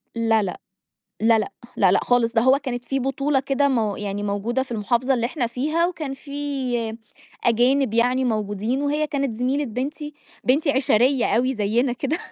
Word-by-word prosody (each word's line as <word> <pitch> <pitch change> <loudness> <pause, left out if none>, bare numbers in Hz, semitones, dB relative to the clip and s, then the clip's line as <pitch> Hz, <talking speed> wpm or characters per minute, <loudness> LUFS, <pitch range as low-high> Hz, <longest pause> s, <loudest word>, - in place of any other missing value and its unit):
لا، 225 -1 +2
لأ، 180 -3 -4 0.6
لا، 225 0 +4
لأ، 215 - -3 0.2
لا، 190 -3 +4
لأ، - - +4
خالص، 245 -1 +2
ده 225 -1 +2
هو 260 +2 +5
كانت 245 -4 -5
في 270 +3 -1
بطولة 270 +1 0
كده 275 +1 +1
مو 220 -6 0
يعني 205 0 -4
موجودة 205 +6 -1
في 260 - -8
المحافظة 240 +4 +1
اللي 235 -1 0
إحنا 250 -2 -2
فيها، 305 +8 0
وكان 310 -6 -4
في 265 -5 -3 0.5
أجانب 245 +1 +3
يعني 250 +3 +2
موجودين، 215 +3 -1
وهي 295 +1 0
كانت 275 -5 -2
زميلة 260 +5 0
بنتي، 285 +5 -5 0.3
بنتي 280 +4 +3
عِشَريّة 260 -1 +2
أوي 255 +3 +1
زيّنا 235 +4 +1
كده. 280 +6 -2
250 Hz, 170 wpm, -23 LUFS, 225-275 Hz, 0.6 s, هو